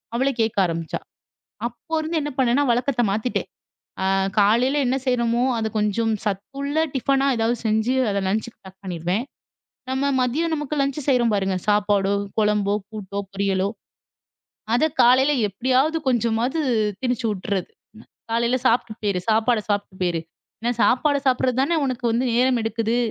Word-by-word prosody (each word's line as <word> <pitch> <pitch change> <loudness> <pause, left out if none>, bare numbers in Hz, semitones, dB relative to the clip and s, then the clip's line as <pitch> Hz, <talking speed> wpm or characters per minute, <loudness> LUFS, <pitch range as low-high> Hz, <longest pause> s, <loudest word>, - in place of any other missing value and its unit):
அவளே 265 +3 +2
கேட்க 220 -2 -1
ஆரம்பிச்சா. 165 -1 -3 0.7
அப்போ 240 +7 -19
இருந்து 320 +1 -1
என்ன 295 - -3
பண்ணேன்னா, 260 +2 +3
வழக்கத்த 245 +1 +1
மாத்திட்டேன். 220 +4 -2 0.6
ஆ - - +1 0.3
காலையில 240 +8 +3
என்ன 255 +2 +1
செய்றோமோ 235 -1 +1
அத 220 - -1
கொஞ்சம் 215 +2 +1
சத்துள்ள 275 +9 -3 0.2
டிஃபனா 270 +1 +2
எதாவது 230 +1 +1
செஞ்சு 220 +3 +1 0.2
அத 200 - -1
லன்ச்சுக்கு 220 +4 -2
பேக் 190 +1 -14
பண்ணிருவேன். 180 +4 -2 0.7
நம்ம 265 +1 0 0.2
மதியம் 305 +7 0
நமக்கு 295 -1 -3
லஞ்ச் 275 +1 0
செய்றோம் 240 -4 +3
பாருங்க! 190 -1 0
சாப்பாடோ! 205 -1 +2 0.2
குழம்போ! 210 -1 +2 0.2
கூட்டோ! 200 -2 -6
பொரியலோ 195 -1 0 1.1
அத 250 - +2 0.2
காலையில 260 +4 +5 0.2
எப்பிடியாவது 260 - +1
கொஞ்சமாவது 240 +4 +1 0.4
திணிச்சு 245 -2 -1
உட்றது. 190 -1 -3 0.6
"காலையில 235 +2 +2
சாப்பிட்டு 235 -2 +2
போயிரு. 200 -3 0
சாப்பாட 225 +1 +3
சாப்பிட்டு 200 -2 -2
போயிரு. 175 -2 0 0.4
ஏன்னா, 240 +1 0
சாப்பாடு 285 +3 +3
சாப்பிட்றது 255 0 +2
தானே 330 +4 +1
உனக்கு 250 -2 -3
வந்து 240 +3 +1
நேரம் 250 0 +3
எடுக்குது." 225 +1 -1
235 Hz, 140 wpm, -23 LUFS, 205-260 Hz, 1.1 s, காலையில